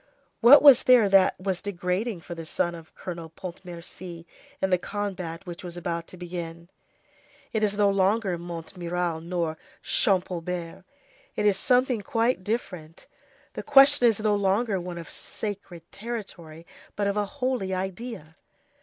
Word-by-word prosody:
What 255 +6 +8
was 280 -4 +9
there 245 -4 +6
that 195 -2 +4
was 185 -1 -2
degrading 190 +1 -2
for 175 - -8
the 165 -1 -7
son 175 +2 -1
of 165 -2 -12
Colonel 170 -3 -7
Pontmercy 175 0 -9 0.3
in 190 - 0
the 180 - +3
combat 185 -4 -5
which 175 0 -8
was 175 -1 -7
about 170 -1 -4
to 185 - -12
begin? 170 -1 -7 0.8
It 220 - 0
is 205 -1 +1
no 205 -1 +4
longer 195 0 +1
Montmirail 170 0 -4
nor 170 -2 -3 0.2
Champaubert; 180 -3 -1 0.5
it - - -1
is 205 -2 +4
something 250 0 +2
quite 225 -1 0
different. 180 -7 -5 0.5
The - - -5
question 275 -2 +7
is 225 -3 +2
no 215 -1 +2
longer 200 0 +1
one 175 0 -6
of 170 - -8
sacred 200 -5 -7
territory,—but 195 -4 -7
of 200 0 0
a 210 0 +1
holy 250 -8 -1
idea. 190 -3 -5
185 Hz, 145 wpm, -26 LUFS, 170-210 Hz, 0.8 s, was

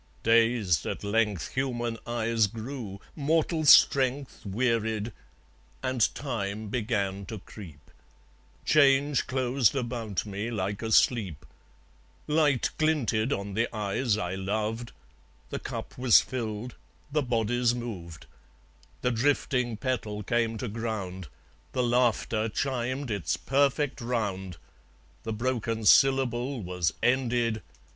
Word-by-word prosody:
Dazed 115 -6 +3
at - - -4
length 105 -2 0
Human 120 -3 -1
eyes 115 -2 +1
grew, 115 -2 -7 0.2
mortal 155 +2 +1
strength 135 -1 +5
Wearied; 110 0 0 0.7
and 130 -4 +1
Time 110 -5 -4
began 100 -4 -1
to 110 - -5
creep. 90 -7 -12 0.7
Change 140 -1 +4
closed 130 -2 +2
about 120 -6 -2
me 105 +2 -4
like 100 -3 -3
a 110 -1 -3
sleep. 95 - +2 0.8
Light 150 -4 +2
glinted 140 -7 +1
on 100 -4 -2
the 115 +3 +1
eyes 105 +1 0
I 90 -4 -2
loved. 110 +4 -2 0.6
The - - -3
cup - - -6
was 125 -3 +7
filled. 120 -1 -4 0.4
The 150 +1 +2
bodies 120 -1 +1
moved. 90 -10 -7 0.8
The 125 - +2
drifting 125 -1 +1
petal 110 -4 -2
came 115 0 0
to 125 - -4
ground. 100 -5 -4 0.5
The 125 - +1
laughter 120 -2 +1
chimed 130 +1 -2
its 100 -4 -1
perfect 140 0 +1
round. 100 -7 -2 0.6
The 110 - -4
broken 115 -1 -2
syllable 135 +1 +4
was 90 -1 -1
ended. 120 -3 +1
115 Hz, 110 wpm, -28 LUFS, 105-130 Hz, 0.8 s, was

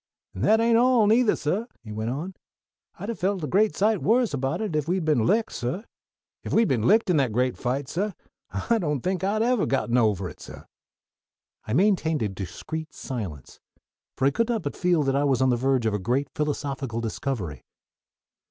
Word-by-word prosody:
"An' - - -7
that 220 +1 +4
ain't 230 0 +4
all, 245 -3 +4
neither, 225 +2 +4
suh," 195 +10 -2 0.2
he 110 - -9
went 110 +2 -3
on. 155 +9 -4 0.6
"I'd 200 +5 -6
ha' - - 0
felt 190 -2 -1
a - - -1
great 210 +8 +2
sight 210 +1 +2
worse 235 -1 +2
about 135 -1 -1
it 215 -7 -3
if 150 -1 0
we'd 180 -1 0
been 135 -8 +2
licked, 220 +2 +2
suh. 130 - -3 0.6
If - - -4
we'd 225 0 +4
been 120 -3 +1
licked 220 -3 +4
in 170 - +3
that 135 -5 +2
great 125 +3 +1
fight, 130 +2 -2
suh, 200 +7 -2 0.4
I 235 -1 0
don't 150 - -1
think 185 +2 -2
I'd 210 +3 +1
evah 245 0 +2
have - - 0
got 135 -3 0
ovah 105 -6 +2
it, - - -16
suh." - - -11 1.0
I 110 - -2
maintained 165 - +2
a 105 - 0
discreet 155 - -6
silence; 95 - -6 0.6
for 130 - +1
I 140 - +4
could 230 - 0
not 230 -3 -1
but - - -4
feel 175 -4 +2
that 135 -1 0
I 140 - +2
was 135 -4 +2
on 130 -1 +3
the - - +3
verge 130 0 +1
of 110 - +1
a 105 - 0
great 130 +8 -1
philosophical 140 -5 -2
discovery. 110 - -4
150 Hz, 205 wpm, -25 LUFS, 125-205 Hz, 1.0 s, that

